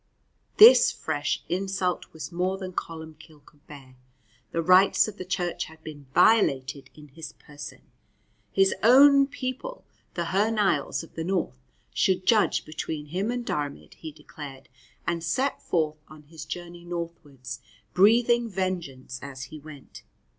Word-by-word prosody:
This 450 +4 +9
fresh - - -3
insult 190 0 -2
was 160 +2 -8
more 180 +2 -1
than 185 -1 -7
Columbcille 160 -3 -8
could 145 0 -24
bear. 135 -4 -13 0.5
The 165 - -2
rights 185 +5 +5
of 210 -1 -8
the 185 - -5
Church 175 -1 -2
had 160 0 -16
been 145 -3 -10
violated 140 -8 +3
in 150 -1 -14
his 160 +4 -9
person. 145 0 -11 0.7
His 195 0 +3
own 275 +4 +7
people, 275 - -6 0.3
the 170 - -2
Hy 205 +3 +3
Nialls 210 -6 0
of 165 - -15
the 165 - -4
north, 170 -8 -2 0.3
should 185 -1 +1
judge 215 0 +3
between 155 -1 -5
him 195 +5 -1
and 245 0 -3
Diarmaid, 145 -6 -4
he 160 - -9
declared, 140 -3 -11 0.4
and 170 -1 -2
set 255 +12 -1
forth 155 -3 -1
on 155 -1 -14
his 160 +1 -10
journey 175 +1 -8
northwards, 150 -8 -7 0.3
breathing 235 +4 +4
vengeance 170 -10 -4
as 135 -1 -8
he 155 +3 -9
went. 150 -2 -13
170 Hz, 145 wpm, -26 LUFS, 150-195 Hz, 0.7 s, This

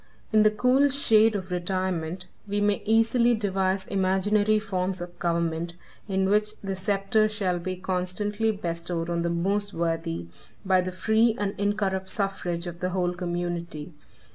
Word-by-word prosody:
In 215 - +6
the 215 - +6
cool 250 +6 +3
shade 225 -5 +4
of 185 -2 -4
retirement, 180 -1 -2 0.2
we 205 +1 -1
may 205 0 +1
easily 230 +2 +4
devise 190 -2 0
imaginary 205 +2 +2
forms 190 -3 -2
of 175 0 -8
government, 170 0 -1 0.3
in 190 -1 +1
which 210 +1 +1
the 195 -1 -2
sceptre 200 +2 +1
shall 190 -4 -1
be 185 +2 -3
constantly 185 +4 -1
bestowed 170 -3 -3
on 170 0 0
the 170 - 0
most 200 +4 0
worthy, 165 - -2 0.4
by 190 -1 +4
the 185 0 -3
free 220 +5 +2
and 200 -1 -1
incorrupt 200 -2 0
suffrage 185 -4 -2
of 175 -1 -7
the 185 - -1
whole 180 -1 0
community. 175 -3 -4
190 Hz, 150 wpm, -26 LUFS, 175-210 Hz, 0.4 s, In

